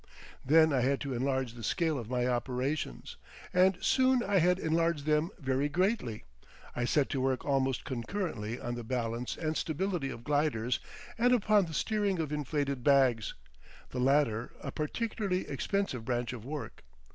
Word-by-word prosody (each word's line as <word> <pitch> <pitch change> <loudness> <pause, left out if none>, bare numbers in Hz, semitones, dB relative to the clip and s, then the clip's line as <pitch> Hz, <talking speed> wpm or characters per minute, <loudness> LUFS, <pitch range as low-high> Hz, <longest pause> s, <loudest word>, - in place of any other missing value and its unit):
Then 160 +2 +5
I 130 - +2
had 135 +2 +2
to 140 -2 -3
enlarge 130 -1 -1
the 120 - -10
scale 155 +6 0
of 115 -2 -7
my 125 -1 0
operations, 125 - -2 0.4
and 185 0 +4
soon 260 -1 +3
I 200 -3 +2
had 180 +2 +3
enlarged 165 -3 0
them 150 +2 +2
very 135 -2 0
greatly. 180 - 0 0.5
I 125 - 0
set 140 +3 +2
to 135 - -1
work 130 -1 0
almost 135 -2 0
concurrently 120 - -3
on 120 - -4
the 120 0 -5
balance 120 0 -2
and 155 -1 -2
stability 170 -2 -1
of 115 - -7
gliders 145 -5 +1 0.4
and 245 +2 +4
upon 210 -5 +3
the 160 - -6
steering 205 -2 0
of 155 -3 -2
inflated 140 -3 -2
bags, 130 -6 +3 0.6
the 125 - -3
latter 125 -4 +2
a - - -5
particularly 195 +3 -2
expensive 195 - -2
branch 120 0 -2
of 115 -4 -7
work. 145 +2 -6
140 Hz, 160 wpm, -31 LUFS, 125-170 Hz, 0.6 s, Then